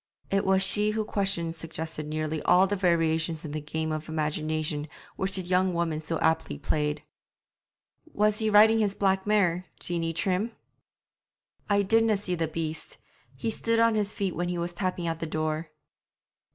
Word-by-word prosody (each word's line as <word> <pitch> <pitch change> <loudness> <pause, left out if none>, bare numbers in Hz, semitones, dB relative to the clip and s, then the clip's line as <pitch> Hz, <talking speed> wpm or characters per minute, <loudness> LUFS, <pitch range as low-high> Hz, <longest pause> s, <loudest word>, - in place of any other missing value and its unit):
It 195 0 +2
was 190 0 +4
she 210 +2 +1
whose 215 0 -1
questions 175 -6 -1
suggested 160 -2 -6
nearly 155 0 -2
all 180 +2 +5
the 205 +1 -1
variations 165 -3 +1
in 150 - -5
the 155 +1 -3
game 160 +1 -3
of 155 0 -4
imagination 155 -1 -2 0.3
which 190 0 -1
the 190 - -1
young 180 0 +1
woman 165 -2 -1
so 160 +1 -2
aptly 160 -2 +1
played. 150 +1 -1 1.1
'Was 210 0 +2
he 220 -1 +1
riding 220 +2 +6
his 205 -2 +1
black 190 0 +1
mare, 185 -4 +2
Jeanie 165 -1 -2
Trim?' 190 +6 0 1.2
'I 200 0 +3
didna 225 +1 +3
see 195 -2 -3
the 165 -2 0
beast. 160 0 -4 0.4
He 225 - -2
stood 230 +1 0
on 230 0 +5
his 210 -1 0
feet 195 -4 -2
when 175 +1 -1
he 180 - -2
was 170 0 -3
tapping 185 -1 -2
at 165 -1 -2
the 165 - -3
door.' 155 0 -2
175 Hz, 170 wpm, -27 LUFS, 160-200 Hz, 1.2 s, riding